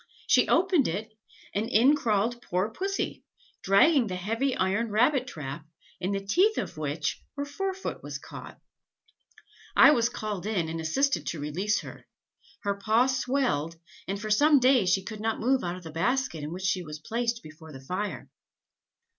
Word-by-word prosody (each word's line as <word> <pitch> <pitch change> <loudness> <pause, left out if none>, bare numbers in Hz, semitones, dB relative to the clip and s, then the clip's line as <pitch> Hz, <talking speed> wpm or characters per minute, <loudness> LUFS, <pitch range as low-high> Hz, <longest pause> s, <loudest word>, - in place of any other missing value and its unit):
She - - +4
opened 355 -6 +3
it, 215 +6 -4 0.4
and 215 +3 -1
in 255 +5 +5
crawled 230 -2 0
poor 185 +2 -1
Pussy, 390 - -3 0.4
dragging 240 - +4
the 185 - -4
heavy 225 +8 -1
iron 200 +5 0
rabbit 250 +5 +2
trap, 145 - -6 0.4
in 185 +2 -2
the 195 0 -3
teeth 385 - +3
of - - -3
which 155 0 -3 0.2
her 285 - -2
fore 380 +7 -3
foot 385 - -5
was - - -6
caught. - - -11 1.2
I - - +8
was 235 -5 +2
called 210 -4 -4
in, 180 -7 -1
and 165 0 -4
assisted 270 - 0
to 165 - -3
release 180 +9 -1
her; - - -11 0.5
her 200 - 0
paw 220 +4 +3
swelled, 255 - 0 0.3
and 195 +1 -3
for 215 +1 -4
some 290 +6 +5
days 250 -7 +4
she 190 +1 +2
could 215 +1 -7
not 225 0 -1
move 260 +3 +2
out 175 0 -2
of 185 - -11
the 160 - -8
basket 170 - 0
in 150 - -5
which 185 +2 -6
she 190 -1 +1
was 155 -3 -7
placed 230 +8 -2
before 155 +1 -12
the 135 - -9
fire. 185 +10 -4
215 Hz, 175 wpm, -27 LUFS, 180-255 Hz, 1.2 s, I